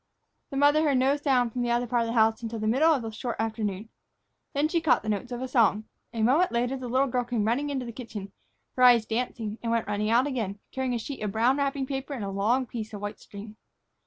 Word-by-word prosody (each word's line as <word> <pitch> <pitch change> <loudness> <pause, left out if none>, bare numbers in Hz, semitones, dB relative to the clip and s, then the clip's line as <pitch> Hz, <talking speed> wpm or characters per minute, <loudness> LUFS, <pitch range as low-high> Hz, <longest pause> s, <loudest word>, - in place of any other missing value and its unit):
The 275 - -5
mother 290 +2 +5
heard 290 -4 +2
no 265 +2 +3
sound 260 -5 +1
from 250 - -2
the 240 - -1
other 240 +1 +1
part 240 0 +1
of 230 - -1
the 230 - -2
house 220 -1 +3
until 230 0 -4
the 215 - -3
middle 270 +9 +4
of 275 -6 +1
the 225 - -5
short 235 +2 -4
afternoon. 215 -2 -3 0.7
Then 290 +2 +2
she 335 +1 0
caught 320 - +3
the 215 - -4
notes 215 +4 -2
of 245 +1 -4
a - - -3
song. 220 -4 +3 0.3
A 225 -2 -2
moment 295 +11 +3
later 245 +2 0
the 260 -2 -6
little 260 +3 +2
girl 250 -1 -1
came 235 -3 -1
running 260 +6 0
into 265 -3 -3
the 235 - -6
kitchen, 220 -5 -8 0.4
her 255 - -2
eyes 240 -3 +7
dancing, 225 -2 -3
and 230 - -2
went 230 -1 +1
running 210 +1 -1
out 240 +4 +4
again, 225 -8 -3
carrying 260 -2 -2
a - - 0
sheet 265 +3 -6
of 210 -2 -2
brown 240 +5 +3
wrapping 275 -1 -1
paper 270 +1 -4
and 220 -6 -4
a 195 - -4
long 225 +7 +1
piece 225 -2 -6
of 200 - -8
white 205 +1 -5
string. 210 +1 -11
240 Hz, 255 wpm, -27 LUFS, 220-265 Hz, 0.7 s, eyes